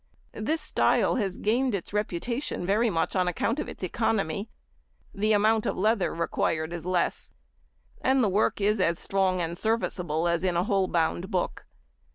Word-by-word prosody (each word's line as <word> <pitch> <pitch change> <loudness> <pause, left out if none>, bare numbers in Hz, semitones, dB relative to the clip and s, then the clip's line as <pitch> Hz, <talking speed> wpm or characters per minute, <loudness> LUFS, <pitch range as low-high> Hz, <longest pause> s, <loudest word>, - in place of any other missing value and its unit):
This 305 +9 -1
style 300 - +2
has 195 -6 -1
gained 240 +2 +1
its 195 +1 -6
reputation 210 - -2
very 215 +5 +2
much 165 -1 -1
on 185 -1 +2
account 230 - 0
of - - -3
its - - -9
economy; 200 0 -1 0.6
the 215 +2 0
amount 215 +1 +3
of - - -2
leather 210 0 +2
required 165 -1 -1
is 170 0 -6
less, 180 -2 -1 0.7
and 265 0 +3
the - - +3
work 200 +3 +1
is 210 +1 +2
as 170 -2 +2
strong 190 -1 0
and 170 0 -2
serviceable 175 -6 -1
as 170 +1 +1
in 180 -2 +1
a 175 - +2
whole 195 -1 +1
bound 170 +2 0
book. 185 -4 -2
195 Hz, 170 wpm, -27 LUFS, 175-220 Hz, 0.7 s, amount